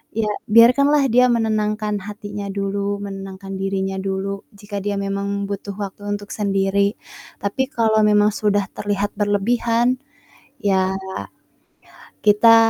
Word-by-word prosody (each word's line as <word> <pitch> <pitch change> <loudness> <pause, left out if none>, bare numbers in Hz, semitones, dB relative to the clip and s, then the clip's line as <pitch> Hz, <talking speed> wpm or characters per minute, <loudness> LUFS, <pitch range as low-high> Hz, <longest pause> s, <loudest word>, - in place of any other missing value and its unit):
ya 215 -1 0 0.2
biarkanlah 270 +5 +6
dia 250 +1 +6
menenangkan 215 -2 0
hatinya 205 -1 -6
dulu, 200 0 -2
menenangkan 195 0 -7
dirinya 195 0 -1
dulu, 195 +1 -3
jika 205 0 -6
dia 205 -1 -1
memang 200 0 -2
butuh 200 0 -5
waktu 205 0 -6
untuk 205 0 -4
sendiri, 200 0 +1 0.4
tapi 260 +7 -1
kalau 220 -2 +2
memang 210 0 +4
sudah 205 -2 +1
terlihat 205 0 -1
berlebihan, 230 +4 +1 0.6
ya 190 -1 +2 1.3
kita 220 +2 +7
205 Hz, 115 wpm, -21 LUFS, 195-215 Hz, 1.3 s, kita